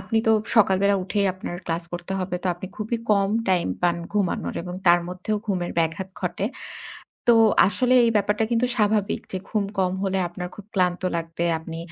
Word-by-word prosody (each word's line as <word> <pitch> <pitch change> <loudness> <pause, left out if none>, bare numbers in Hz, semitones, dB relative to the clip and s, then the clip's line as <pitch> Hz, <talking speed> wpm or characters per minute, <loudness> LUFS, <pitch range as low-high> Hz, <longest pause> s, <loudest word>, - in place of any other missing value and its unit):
আপনি 225 - 0
তো 220 - +6 0.2
সকালবেলা 200 -1 +4
উঠেই 200 +1 0
আপনার 180 -1 -6
ক্লাস 165 +1 -1
করতে 175 +2 -5
হবে, 185 -1 -3
তো - - -2
আপনি 175 +2 -8
খুবই 220 +2 -2
কম 200 -1 +3 0.2
টাইম 185 -2 +2 0.2
পান 175 -1 +3 0.2
ঘুমানোর 200 -4 -1
এবং 180 0 -6
তার 175 0 +6
মধ্যেও 185 +4 -3
ঘুমের 180 -4 -1
ব্যাঘাত 165 +3 -1
ঘটে। 180 +2 -2 0.8
তো 235 - +8 0.3
আসলে 250 +5 +2
এই 230 - +3
ব্যাপারটা 210 +2 +1
কিন্তু 235 +1 +2
স্বাভাবিক 210 -2 +1
যে 190 - -1
ঘুম 210 -2 0
কম 185 -1 +2
হলে 195 -1 0
আপনার 180 +1 -6
খুব 205 - -11
ক্লান্ত 180 -2 +1
লাগবে। 165 0 -3
আপনি 165 0 -8
190 Hz, 180 wpm, -24 LUFS, 175-210 Hz, 0.8 s, তো